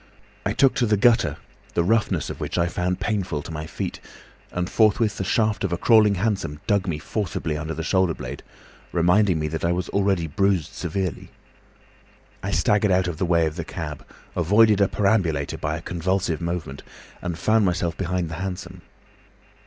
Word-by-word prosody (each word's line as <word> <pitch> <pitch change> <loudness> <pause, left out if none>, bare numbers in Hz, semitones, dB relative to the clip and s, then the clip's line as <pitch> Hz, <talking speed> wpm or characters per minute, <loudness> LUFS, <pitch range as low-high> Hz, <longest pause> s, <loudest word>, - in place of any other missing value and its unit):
I - - 0
took 135 -2 +4
to 120 - +2
the 105 -1 +3
gutter, 115 +3 +3 0.4
the 85 - +3
roughness 110 +4 +1
of - - -8
which - - -3
I 85 - +3
found 90 +1 -1
painful 95 -7 -2
to 85 - -8
my 80 0 -5
feet, - - -5 0.5
and 90 0 -2
forthwith 110 +1 +2
the - - 0
shaft 110 +2 +1
of 95 - -1
a 85 - 0
crawling 105 -2 +5
hansom 95 -7 -1
dug 100 -3 +1
me 80 -4 -1
forcibly 90 -1 -3
under 80 +1 -4
the 80 - -4
shoulder 95 -1 +2
blade, - - -7 0.5
reminding 90 +2 +3
me 75 0 -1
that 80 +1 -4
I 85 - +2
was 90 0 -2
already 95 -4 +1
bruised 90 0 0
severely. 90 +1 -3 1.1
I 100 - -3
staggered 105 0 +2
out 90 -1 +3
of 85 -3 -3
the 90 - 0
way 85 -1 +3
of 80 +1 -3
the 85 - -2
cab, 75 -4 -6 0.3
avoided 105 +4 +4
a 100 - +5
perambulator 95 -10 0
by 80 +1 -2
a 85 - -9
convulsive 90 -1 -1
movement, 85 -5 -4 0.4
and 85 -2 -3
found 110 +5 +3
myself 85 -2 0
behind 90 -1 -1
the 80 - -5
hansom. 90 -1 -5
90 Hz, 185 wpm, -24 LUFS, 85-100 Hz, 1.1 s, crawling